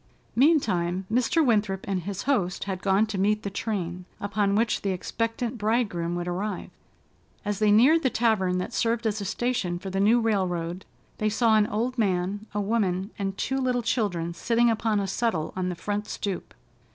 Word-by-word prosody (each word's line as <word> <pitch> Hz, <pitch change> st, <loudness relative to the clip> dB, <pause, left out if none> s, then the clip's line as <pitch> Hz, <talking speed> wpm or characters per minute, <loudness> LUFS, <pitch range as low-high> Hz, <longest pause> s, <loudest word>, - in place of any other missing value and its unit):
Meantime, 195 Hz, -, +2 dB
Mr. 255 Hz, +7 st, +3 dB
Winthrop 205 Hz, -5 st, +1 dB
and 190 Hz, -2 st, -1 dB
his 195 Hz, +2 st, -5 dB
host 205 Hz, -10 st, 0 dB
had 190 Hz, -2 st, -4 dB
gone 195 Hz, +2 st, +3 dB
to 210 Hz, -3 st, -4 dB
meet 210 Hz, +2 st, +2 dB
the 200 Hz, -, -3 dB
train, 180 Hz, -4 st, -3 dB
upon 205 Hz, 0 st, 0 dB
which 220 Hz, +1 st, +1 dB
the 200 Hz, -, -1 dB
expectant 230 Hz, +5 st, -2 dB
bridegroom 205 Hz, -6 st, 0 dB
would 175 Hz, 0 st, -3 dB
arrive. 185 Hz, +2 st, -3 dB, 0.7 s
As 205 Hz, -1 st, -2 dB
they 215 Hz, -1 st, +3 dB
neared 265 Hz, +10 st, +6 dB
the 260 Hz, -, +2 dB
tavern 215 Hz, -7 st, +1 dB
that 180 Hz, -, -3 dB
served 230 Hz, 0 st, 0 dB
as 215 Hz, -1 st, 0 dB
a -, -, -4 dB
station 200 Hz, -5 st, -1 dB
for 190 Hz, +2 st, -6 dB
the 195 Hz, -, -1 dB
new 220 Hz, +5 st, +5 dB
railroad, 185 Hz, -5 st, -1 dB, 0.3 s
they 215 Hz, -, +2 dB
saw 220 Hz, +1 st, +3 dB
an 210 Hz, -1 st, +4 dB
old 240 Hz, +4 st, -2 dB
man, 195 Hz, +1 st, 0 dB
a 210 Hz, -, -2 dB
woman, 200 Hz, -2 st, 0 dB
and 195 Hz, -1 st, -2 dB
two 265 Hz, +5 st, -1 dB
little 250 Hz, -2 st, 0 dB
children 180 Hz, -8 st, -1 dB
sitting 235 Hz, +6 st, +2 dB
upon 220 Hz, -1 st, +1 dB
a 200 Hz, -, -1 dB
settle 190 Hz, -5 st, -1 dB
on 185 Hz, -1 st, -1 dB
the 180 Hz, -, -3 dB
front 205 Hz, +4 st, -3 dB
stoop. 195 Hz, -3 st, -4 dB
205 Hz, 185 wpm, -26 LUFS, 185-230 Hz, 0.7 s, neared